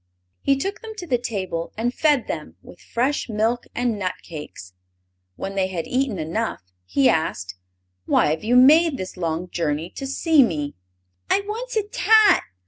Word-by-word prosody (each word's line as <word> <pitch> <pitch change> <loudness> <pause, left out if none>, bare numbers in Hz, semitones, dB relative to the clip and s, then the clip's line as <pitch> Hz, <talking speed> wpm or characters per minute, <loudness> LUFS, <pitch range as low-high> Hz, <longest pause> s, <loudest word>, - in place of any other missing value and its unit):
He 275 -1 +2
took 395 +10 -3
them 445 -1 -8
to 370 - -7
the 250 -7 +1
table 190 -8 -4
and 240 +2 -1
fed 295 -5 +2
them 150 - -6
with - - -14
fresh 255 +3 -1
milk 225 +3 0
and 240 -3 0
nut 185 -2 -2
cakes. 150 - -9 0.6
When 195 - -5
they 190 -1 +1
had 175 -4 -4
eaten 255 -5 -1
enough 165 - -3 0.2
he 130 +9 +3
asked: 95 - 0 0.5
"Why - - +3
have 160 +4 -2
you 235 +3 +2
made 300 +4 +6
this 185 -4 -6
long 170 0 -2
journey 160 0 -2
to 270 - -6
see 310 +2 +3
me?" 150 - 0 0.6
"I 395 - +3
wants 455 +5 -5
a 430 - +2
tat!" 430 -2 +5
225 Hz, 170 wpm, -23 LUFS, -, 0.6 s, made